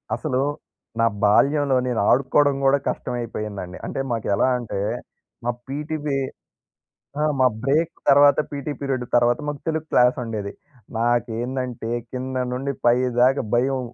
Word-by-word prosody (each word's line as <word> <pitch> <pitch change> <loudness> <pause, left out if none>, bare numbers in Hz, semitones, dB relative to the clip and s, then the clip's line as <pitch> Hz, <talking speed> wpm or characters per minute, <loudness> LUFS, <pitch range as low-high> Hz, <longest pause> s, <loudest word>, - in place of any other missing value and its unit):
అసలు 130 -4 -1 0.6
నా 115 - +4 0.2
బాల్యంలో 140 +6 +4
నేను 120 -3 0
ఆడుకోవడం 140 +2 +3
కూడా 135 +1 +5
కష్టమైపోయిందండి. 105 -6 -4
అంటే - - -4
మాకు 115 -2 -2
ఎలా - - +2
అంటే 115 -5 -4 0.7
మా 120 - +2 0.2
పీటీ 150 +3 -3
పి 140 - 0 1.0
ఆ! - - +1 0.2
మా 130 - +5 0.2
బ్రేక్ 155 +5 +1 0.2
తర్వాత 140 0 +6
పీటీ 145 +1 -4
పీరియడు 135 -3 -2
తర్వాత, 120 0 +4
మాకు 145 -1 -3
తెలుగు 160 -1 -1
క్లాస్ 125 0 +4
ఉండేది. 105 -3 -4 0.5
నాకేందంటే 120 +1 -1 0.2
కింద 130 0 -4
నుండి 135 +3 -2
పైదాకా 125 +2 +3
భయం. 130 +2 +2
130 Hz, 130 wpm, -23 LUFS, 120-140 Hz, 1.0 s, తర్వాత